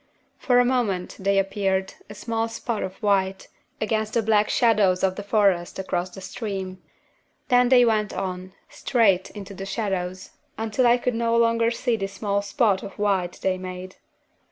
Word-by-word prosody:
For 245 -2 +3
a 245 - +4
moment 225 -8 -1
they 200 +1 +1
appeared, 195 -1 0 0.2
a 210 - -9
small 225 +2 -2
spot 230 -1 -4
of 190 0 -4
white, 195 -2 +1 0.3
against 215 0 -1
the 230 - +2
black 215 -1 +3
shadows 210 -6 +3
of 190 -1 +2
the 205 - -5
forest 200 -4 +1
across 185 -1 -2
the 190 +2 -11
stream; 190 -2 -5 0.7
then 245 0 +4
they 250 -2 +6
went 215 -2 +1
on, 185 -1 -5
straight 200 -8 +1
into 200 -1 -9
the 195 0 -7
shadows, 190 -3 -3 0.3
until 225 +3 +1
I 240 +1 +5
could 250 0 -1
no 230 0 +1
longer 230 0 +3
see 235 0 -1
this 195 -1 -4
small 200 0 -1
spot 200 -2 +1
of 195 - -9
white 195 -4 0
they 185 -1 0
made. 185 0 -8
200 Hz, 170 wpm, -24 LUFS, 190-230 Hz, 0.7 s, they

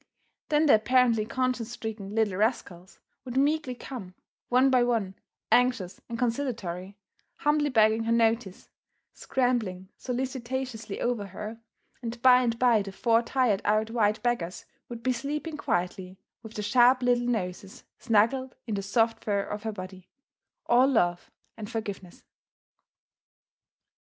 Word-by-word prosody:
Then 305 0 +3
the 290 - +6
apparently 230 -1 +3
conscience 250 -2 -1
stricken 215 -3 -6
little 215 -4 +1
rascals 195 -5 -2 0.3
would 255 0 -5
meekly 285 -2 +1
come, 220 -8 -8 0.3
one 255 +2 +4
by 255 -1 +4
one, 225 -6 0 0.4
anxious 245 -7 +2
and 230 - -4
conciliatory, 225 -7 -3 0.4
humbly 295 0 +1
begging 220 -2 +3
her 230 - 0
notice, 225 -4 0 0.4
scrambling 220 -8 -1
solicitously 255 -3 -4
over 235 -5 -1
her, 210 +4 -8 0.4
and 235 -1 -5
by 255 -1 +7
and 230 -2 0
by 235 -3 +4
the 195 0 -6
four 230 +4 +2
tired 240 -5 +1
out 215 +1 +1
white 215 -1 +1
beggars 185 -8 -2 0.2
would 235 -1 -8
be 255 - +2
sleeping 300 +5 -4
quietly 185 -6 -2 0.2
with 220 -1 -11
their 210 - -3
sharp 250 +4 +4
little 245 0 +2
noses 195 -4 -4 0.2
snuggled 240 +3 +1
in 225 - -4
the 200 - -1
soft 225 +3 0
fur 200 -2 0
of 210 +1 -6
her 220 0 -3
body, 185 -2 -9 0.6
all 245 +2 +5
love 175 -10 +1 0.3
and 215 -2 -7
forgiveness. 200 -6 -6
230 Hz, 135 wpm, -27 LUFS, 205-250 Hz, 0.6 s, by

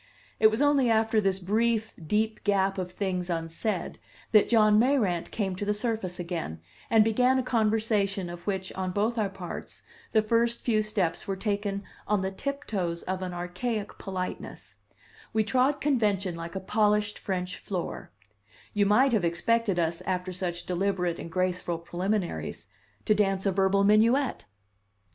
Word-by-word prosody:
It 220 - +8
was 220 +6 0
only 285 -4 +4
after 220 -1 +3
this 195 -2 +1
brief, 220 +4 0
deep 215 +6 0
gap 195 -1 +1
of 180 -1 -4
things 185 -2 -2
unsaid 170 +4 -2 0.3
that 215 -2 +5
John 215 -2 +5
Mayrant 220 -9 +2
came 195 -4 -2
to 185 - -4
the 210 0 0
surface 210 -5 -2
again, 170 - -4 0.3
and 225 -1 +6
began 250 +4 +3
a 260 - +1
conversation 215 -5 +1
of 175 +1 -9
which, 190 -2 -2
on 185 -1 -3
both 220 +4 0
our 205 -2 +1
parts, 190 -3 -8 0.3
the 220 -1 +3
first 235 +2 +1
few 220 -3 +2
steps 200 -6 -1
were 195 - -1
taken 200 0 -2 0.2
on 210 -1 +2
the 190 0 -2
tiptoes 195 -9 -3
of 190 0 -3
an 185 -1 -3
archaic 185 +5 -4
politeness; 185 -1 -6 0.6
we 220 0 +3
trod 260 +5 +2
convention 210 -10 +1
like 170 +1 -7
a - - -1
polished 210 +1 +1
French 180 -1 -3
floor; 185 -4 -5 0.6
you 205 -1 +3
might 250 +6 +4
have 210 -5 +2
expected 195 +4 +1
us, 165 -1 0
after 185 0 -1
such 175 -1 -4
deliberate 180 -1 -1
and 165 - -7
graceful 180 -1 -1
preliminaries, 180 +3 -3 0.4
to 215 - +4
dance 195 -2 +1
a 195 - +3
verbal 195 +1 +3
minuet. 230 +6 +3
200 Hz, 160 wpm, -28 LUFS, 180-220 Hz, 0.6 s, It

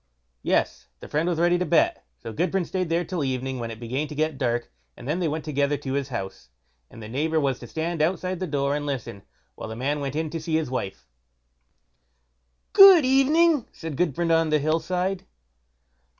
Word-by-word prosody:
Yes! - - 0
the - - -10
friend 155 +4 0
was 170 - -1
ready 175 +1 +3
to 180 - 0
bet; 170 - +2
so 110 - -8
Gudbrand 180 - 0
stayed 185 -2 -2
there 170 +1 0
till 180 -6 -3
evening, 130 -1 -2
when 115 -1 -4
it 110 -1 -8
began 130 +6 -3
to 150 - -8
get 155 -1 -1
dark, 120 -2 -1 0.3
and 120 - -10
then 155 +5 -1
they 175 - 0
went 155 0 -3
together 145 -1 0
to 135 -1 -5
his 140 0 -2
house, 95 - -6 0.4
and 115 - -12
the - - -7
neighbour 155 +7 0
was 135 -3 0
to - - -10
stand 165 0 -3
outside 185 +2 -1
the 185 - -3
door 140 -1 0
and 145 0 -3
listen, 125 -8 -5 0.3
while - - -8
the 110 - -6
man 140 +5 -1
went 140 -1 -4
in 155 -1 -2
to 165 - -4
see 160 0 -2
his 160 -5 -1
wife. 95 - -4 1.7
"Good 390 -7 +9
evening!" 290 +2 +3
said 160 -3 -7
Gudbrand 170 +1 0
on 165 -1 +3
the 155 - +3
Hill 155 +3 +1
side. 185 +2 -2
155 Hz, 205 wpm, -25 LUFS, 135-175 Hz, 1.7 s, Good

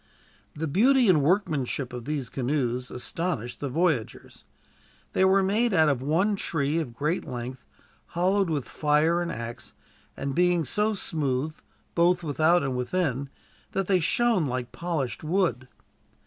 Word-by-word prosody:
The 160 +2 -3
beauty 245 - +4
and 160 -5 +5
workmanship 145 -6 0
of 120 -2 -6
these 145 -4 -2
canoes 125 -2 -1
astonished 125 -1 -3
the 140 - -3
voyagers. 160 -5 -2 0.7
They - - +3
were 190 +1 +4
made 210 +3 +2
out 160 -2 +5
of 135 -4 0
one 170 +10 +1
tree 155 -4 -1
of 125 -8 -5
great 150 +7 -1
length, 125 +1 -7 0.5
hollowed 190 +1 +2
with 145 -5 -2
fire 155 +3 +2
and 170 -1 -2
axe; 115 -4 -7 0.4
and 135 0 -3
being 175 0 +2
so 210 - 0
smooth, 150 -4 -2 0.4
both 175 +1 +3
without 160 +3 +3
and 135 -2 -2
within, 135 0 -1 0.4
that 195 - 0
they 185 0 +3
shone 225 -2 +2
like 125 -1 -3
polished 160 -8 -3
wood. 160 -6 0
155 Hz, 145 wpm, -26 LUFS, 135-180 Hz, 0.7 s, and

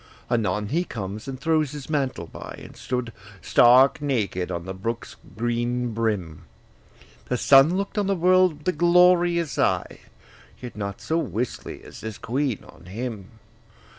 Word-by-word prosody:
Anon 105 -3 0
he 170 +5 +1
comes, 105 - -6
and 130 -1 -6
throws 155 -2 +1
his 145 -2 -8
mantle 135 - -1
by, - - -9
And - - -12
stood 125 -3 -4 0.3
stark 125 +4 +5
naked 105 -11 -1
on 85 -1 -4
the 95 - -5
brook's 115 +5 -5 0.2
green 120 +1 -1
brim: 105 -9 -2 0.8
The 125 - -1
sun 140 +8 +6
look'd 200 +2 -2
on 200 - 0
the 195 - +1
world 180 -3 +3
with 185 - -1
glorious 175 -4 +4
eye, - - 0 0.6
Yet 125 -1 -8
not 100 -2 -5
so 160 +1 0
wistly 115 - -4
as - - -12
this 110 -2 -6
queen 130 -1 -2
on 80 +2 -16
him. 105 0 -6
125 Hz, 150 wpm, -24 LUFS, 105-155 Hz, 0.8 s, sun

